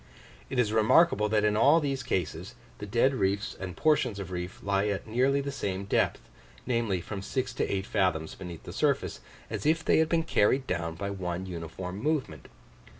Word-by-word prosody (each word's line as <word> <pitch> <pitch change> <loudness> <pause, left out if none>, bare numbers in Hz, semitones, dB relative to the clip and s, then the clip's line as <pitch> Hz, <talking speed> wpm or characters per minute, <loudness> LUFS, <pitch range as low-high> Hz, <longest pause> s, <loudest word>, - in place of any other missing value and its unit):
It 130 - -4
is 110 -3 +2
remarkable 110 +1 +4
that 105 0 +2
in 105 0 +2
all 140 +9 +6
these 140 -3 -2
cases, 95 -2 -3 0.2
the 105 - -6
dead 120 +6 +3
reefs 100 -2 -1
and 90 -3 -6
portions 150 -9 +2
of 95 -3 -6
reef 90 +1 -5
lie 100 +1 +1
at 100 -1 -2
nearly 130 +5 +2
the 140 0 -4
same 100 -7 -3
depth, 100 - 0 0.4
namely, 115 -7 0
from 100 +2 -6
six 130 +4 -2
to - - -1
eight 95 -1 -1
fathoms 90 -7 0
beneath 90 -3 -9
the - - -8
surface, - - 0 0.3
as - - -4
if 160 +2 +2
they - - +4
had 160 0 +2
been 165 -1 +2
carried 130 -2 +2
down 85 -4 -2
by 100 +4 -4
one 90 -1 -4
uniform 90 +2 -6
movement. 150 -2 -2
105 Hz, 190 wpm, -29 LUFS, 95-130 Hz, 0.4 s, all